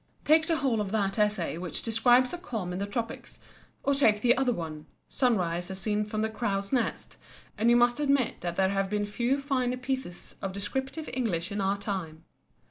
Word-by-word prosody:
Take 315 +1 +5
the 330 - +2
whole 260 -7 +1
of 200 - -3
that 200 -1 0
essay 210 -5 +1
which 180 -1 -4
describes 240 +4 +4
a 350 - -4
calm 220 - -4
in 180 - -3
the 200 - -2
Tropics, 230 +2 -5 0.4
or 280 - +2
take 220 -7 +3
the 245 +1 +5
other 260 -1 +2
one: 160 -6 -5 0.2
"Sunrise 180 -9 0
as 190 - -5
seen 210 +1 0
from 215 0 -2
the 220 - 0
Crow's 200 -1 -2
nest," 245 -3 -1 0.4
and 225 +3 +2
you 240 - +6
must 240 +2 +4
admit 280 -4 +1
that 175 -1 -3
there 190 +1 +2
have 195 0 0
been 210 0 0
few 240 +6 0
finer 255 -3 0
pieces 260 -8 -5
of 195 -1 -3
descriptive 265 +9 -3
English 185 -9 -1
in 205 0 -2
our 195 +1 +1
time. 185 -6 -4
215 Hz, 200 wpm, -28 LUFS, 195-255 Hz, 0.4 s, you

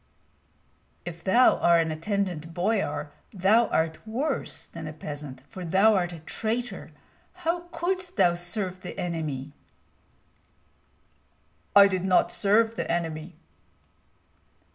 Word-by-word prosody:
"If 170 -1 -7
thou 240 +6 +5
art 170 0 +4
an 160 - -3
attendant 165 -1 -3
boyar, 175 -6 -1 0.2
thou 210 +4 +3
art 160 0 0
worse 270 +6 -2
than 165 -2 -8
a 155 - -6
peasant, 145 -4 -8
for 185 - -8
thou'rt 190 +1 +3
a 170 - -8
traitor. 230 +8 -3 0.6
How 345 +1 -1
couldst 360 +1 -2
thou 175 - +5
serve 185 +1 -3
the 180 - -8
enemy?" 150 -5 -4 2.2
"I 200 0 +10
did 185 -2 -2
not 185 -1 +3
serve 220 +3 +3
the - - -3
enemy." 165 0 -3
180 Hz, 115 wpm, -26 LUFS, 160-220 Hz, 2.2 s, I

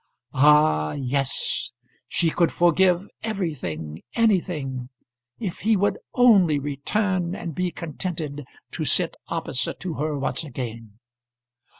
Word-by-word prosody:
Ah! 145 - +4
yes; 135 0 -1 0.4
she 165 -2 +1
could 170 0 +2
forgive 180 +2 +3
everything, 125 - -4
anything, 160 - 0 0.5
if 190 -5 -4
he 220 0 +3
would 200 +2 +1 0.2
only 200 - +6
return 175 +6 -1
and 170 - -5
be 180 +3 -1
contented 160 -3 -5 0.3
to - - -3
sit - - +2
opposite - - -2
to 180 -2 -3
her 150 -1 -1
once 140 - -1
again. 115 -6 -7
160 Hz, 110 wpm, -24 LUFS, 135-185 Hz, 0.5 s, only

